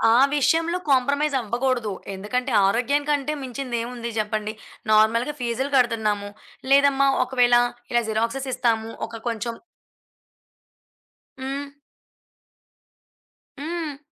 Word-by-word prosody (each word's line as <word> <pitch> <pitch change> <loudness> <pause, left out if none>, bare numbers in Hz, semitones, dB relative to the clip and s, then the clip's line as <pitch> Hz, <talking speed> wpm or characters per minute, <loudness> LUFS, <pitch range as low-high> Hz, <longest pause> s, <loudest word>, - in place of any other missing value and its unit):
ఆ - - +6 0.2
విషయంలో 330 +4 +2
కాంప్రమైజవ్వగూడదు. 255 -4 +1 0.2
ఎందుకంటే, 250 +7 -2
ఆరోగ్యం 250 +8 +1
కంటే 295 0 +1
మించిందేముంది 240 -2 -4
జెప్పండి. 215 0 -1 0.4
నార్మల్‌గా 225 +6 +3
ఫీజులు 250 +3 -2
గడుతున్నాము. 215 -4 +1 0.4
లేదమ్మా! 275 0 +5 0.2
ఒకవేళ 245 -2 +3 0.4
ఇలా 240 0 +3
జిరాక్సెసిస్తాము. 230 0 -1 0.2
ఒక 230 - -8
కొంచెం 230 +1 -3 1.9
హ్మ్. 275 +2 -4 1.9
హ్మ్. 315 -1 -4
250 Hz, 80 wpm, -23 LUFS, 230-275 Hz, 1.9 s, ఆ